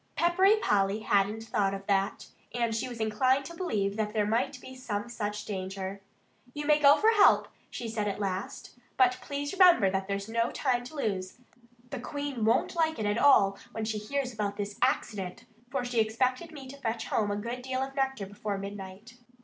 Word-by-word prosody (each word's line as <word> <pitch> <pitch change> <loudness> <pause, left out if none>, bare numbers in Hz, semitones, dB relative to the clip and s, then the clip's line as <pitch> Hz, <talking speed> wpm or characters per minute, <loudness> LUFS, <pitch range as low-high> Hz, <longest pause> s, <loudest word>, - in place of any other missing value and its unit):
Peppery 375 +4 +4
Polly 205 - +1
hadn't 205 +1 +1
thought 195 -3 0
of 195 0 -8
that. 195 -1 0 0.3
And 235 -2 0
she 230 +3 -2
was 240 -2 -8
inclined 255 +5 +2
to 340 - -8
believe 210 - -1
that 210 -1 -1
there 210 -2 +1
might 250 +5 0
be 260 +1 -11
some 230 -4 -4
such 210 -2 -4
danger. 190 0 -5 0.5
"You 295 0 -4
may 300 0 +4
go 285 -1 +7
for 440 +1 +4
help," 420 -3 +5 0.2
she 235 - -5
said 220 -2 -2
at 200 - -3
last. 195 -1 -4 0.3
"But 255 -1 +4
please 285 +4 -4
remember 355 - +6
that 190 0 -2
there's 200 0 -3
no 230 +1 0
time 250 -3 0
to 280 - -10
lose. 195 -9 -3 0.5
The 270 - -4
Queen 285 -2 -4
won't 225 +9 +2
like 320 -1 +1
it 215 - -2
at 205 +2 +1
all 200 -9 +5
when 225 - -3
she 215 -1 -2
hears 255 +4 -3
about 205 -2 -3
this 205 -1 -5
accident, 220 -4 -1 0.2
for 260 -1 -2
she 245 -1 0
expected 255 +8 0
me 280 -4 -9
to 280 - -9
fetch 225 -1 -2
home 210 -2 0
a 205 - -1
good 235 +4 -4
deal 260 +1 -2
of 270 0 -6
nectar 270 -6 -1
before 205 +1 -4
midnight." 200 +4 -8
225 Hz, 200 wpm, -29 LUFS, 205-265 Hz, 0.5 s, go